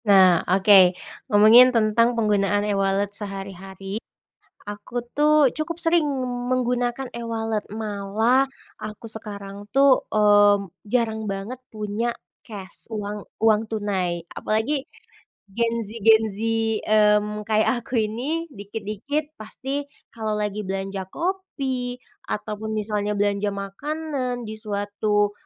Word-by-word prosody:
Nah, 190 Hz, -4 st, +6 dB
oke. 190 Hz, -1 st, +6 dB, 0.3 s
Ngomongin 220 Hz, +4 st, +8 dB
tentang 230 Hz, 0 st, +2 dB
penggunaan 205 Hz, -2 st, +2 dB
e-wallet 200 Hz, 0 st, 0 dB
sehari-hari, 195 Hz, 0 st, -6 dB, 0.7 s
aku 210 Hz, +4 st, -5 dB, 0.2 s
tuh 300 Hz, -1 st, +5 dB
cukup 330 Hz, +2 st, -3 dB
sering 330 Hz, -1 st, +3 dB, 0.5 s
menggunakan 245 Hz, 0 st, 0 dB
e-wallet, 225 Hz, -2 st, -2 dB
malah 220 Hz, +4 st, +1 dB, 0.3 s
aku 215 Hz, +1 st, -8 dB
sekarang 205 Hz, -2 st, -5 dB
tuh 275 Hz, 0 st, +5 dB
mmm, 205 Hz, -1 st, +5 dB, 0.2 s
jarang 220 Hz, -1 st, 0 dB
banget 195 Hz, +6 st, -5 dB, 0.2 s
punya 215 Hz, +2 st, -2 dB, 0.3 s
cash, 200 Hz, +1 st, -6 dB
uang 210 Hz, -1 st, -4 dB, 0.2 s
uang 220 Hz, -1 st, +4 dB
tunai. 190 Hz, -5 st, -1 dB, 0.2 s
Apalagi 245 Hz, +6 st, 0 dB, 0.6 s
Gen 230 Hz, +3 st, 0 dB
Z, -, -, -4 dB, 0.2 s
Gen 220 Hz, 0 st, +7 dB
Z, -, -, -5 dB, 0.5 s
mmm, 210 Hz, 0 st, +2 dB
kayak 220 Hz, +3 st, +2 dB
aku -, -, -8 dB
ini, 265 Hz, +10 st, -2 dB
dikit-dikit 220 Hz, +8 st, -4 dB
pasti 270 Hz, +6 st, -4 dB, 0.3 s
kalau 220 Hz, -2 st, -3 dB
lagi 210 Hz, 0 st, -2 dB
belanja 195 Hz, 0 st, -3 dB
kopi 275 Hz, -, -3 dB, 0.3 s
ataupun 210 Hz, +1 st, -4 dB
misalnya 210 Hz, -1 st, -1 dB
belanja 205 Hz, 0 st, +1 dB
makanan 250 Hz, +5 st, -4 dB
di 220 Hz, -, -6 dB
suatu, 205 Hz, 0 st, 0 dB
215 Hz, 110 wpm, -23 LUFS, 205-240 Hz, 0.7 s, Ngomongin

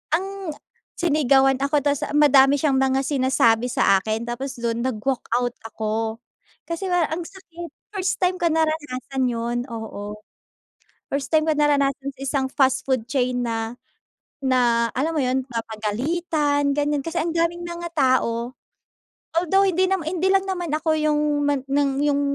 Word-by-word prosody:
ang 375 Hz, +4 st, -2 dB, 0.7 s
sinigawan 275 Hz, -5 st, +3 dB
ako 285 Hz, +2 st, +2 dB
ta’s 285 Hz, -1 st, 0 dB
madami 285 Hz, -1 st, +6 dB
siyang 290 Hz, -4 st, +2 dB
mga 265 Hz, 0 st, +2 dB
sinasabi 255 Hz, -4 st, +2 dB
sa 195 Hz, -, +4 dB
akin 220 Hz, +2 st, -2 dB
tapos 260 Hz, +3 st, -4 dB
dun 235 Hz, 0 st, -1 dB
nag-walkout 245 Hz, 0 st, -1 dB
ako. 220 Hz, 0 st, -3 dB, 0.5 s
Kasi 335 Hz, +3 st, -3 dB
para 350 Hz, -3 st, +2 dB
ang 345 Hz, -, -3 dB
sakit, 345 Hz, -2 st, -10 dB, 0.2 s
first 380 Hz, -2 st, -1 dB
time 365 Hz, 0 st, +2 dB
ko 345 Hz, -, +2 dB
naranasan 295 Hz, -5 st, -1 dB
yun, 235 Hz, 0 st, -2 dB
oo. 215 Hz, -3 st, -6 dB, 1.0 s
First 280 Hz, -1 st, -2 dB
time 310 Hz, 0 st, +4 dB
ko 310 Hz, -, +3 dB
naranasan 280 Hz, -2 st, +1 dB
sa 265 Hz, -, -17 dB
isang 275 Hz, 0 st, 0 dB
fast 265 Hz, -2 st, +2 dB
food 255 Hz, -4 st, 0 dB
chain 250 Hz, -2 st, 0 dB
na 225 Hz, 0 st, -3 dB, 0.7 s
na 240 Hz, -3 st, +3 dB
alam 290 Hz, +6 st, 0 dB
mo 300 Hz, -, +2 dB
‘yon, 260 Hz, +1 st, +1 dB
mapagalitan 280 Hz, -, -1 dB
ganyan. 290 Hz, -1 st, 0 dB
Kasi 330 Hz, +1 st, -3 dB
ang 335 Hz, -, -2 dB
daming 340 Hz, +1 st, 0 dB
mga 345 Hz, 0 st, -6 dB
tao. 255 Hz, -3 st, +1 dB, 0.8 s
Although 375 Hz, +4 st, +3 dB
hindi 375 Hz, 0 st, +2 dB
nama 380 Hz, -5 st, 0 dB
hindi 360 Hz, +2 st, 0 dB
lang 390 Hz, 0 st, +3 dB
naman 355 Hz, -4 st, -3 dB
ako 315 Hz, +1 st, +1 dB
yung 305 Hz, -1 st, +2 dB, 0.3 s
man 285 Hz, -1 st, +1 dB
ng 280 Hz, 0 st, +2 dB, 0.2 s
yung 285 Hz, -1 st, +2 dB
275 Hz, 150 wpm, -23 LUFS, 245-320 Hz, 1.0 s, madami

